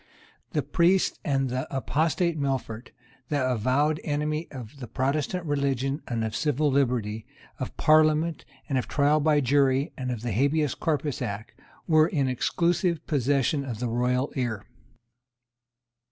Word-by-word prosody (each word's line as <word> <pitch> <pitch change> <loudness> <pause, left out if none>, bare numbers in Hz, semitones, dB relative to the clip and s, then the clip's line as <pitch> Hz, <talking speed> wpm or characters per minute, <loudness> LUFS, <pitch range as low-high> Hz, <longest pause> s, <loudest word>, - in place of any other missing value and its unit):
The - - +1
priests 180 +2 +2
and 135 -2 +1
the 130 +1 -2
apostate 160 +5 0
Melfort, 130 -4 -2 0.4
the 140 -3 +1
avowed 130 +7 +1
enemy 150 +2 -1
of 130 0 -10
the 125 - -7
Protestant 140 +8 -1
religion 140 -1 -1
and 115 -2 -2
of 110 -1 -3
civil 150 0 +1
liberty, 120 -6 0 0.3
of - - -5
Parliaments, 155 +1 +3 0.2
of 135 -4 -1
trial 145 +1 +3
by 150 -1 +3
jury 135 +1 +2
and 130 -1 -4
of 120 -3 -4
the 120 - -2
Habeas 140 +5 +1
Corpus 150 -3 -2
Act, 105 +2 -4 0.4
were 155 -2 +5
in 140 -6 0
exclusive 170 +6 0
possession 140 0 +1
of 125 -5 -5
the 120 +1 -2
royal 125 +3 0
ear. 120 -6 -2
140 Hz, 140 wpm, -26 LUFS, 125-155 Hz, 0.4 s, were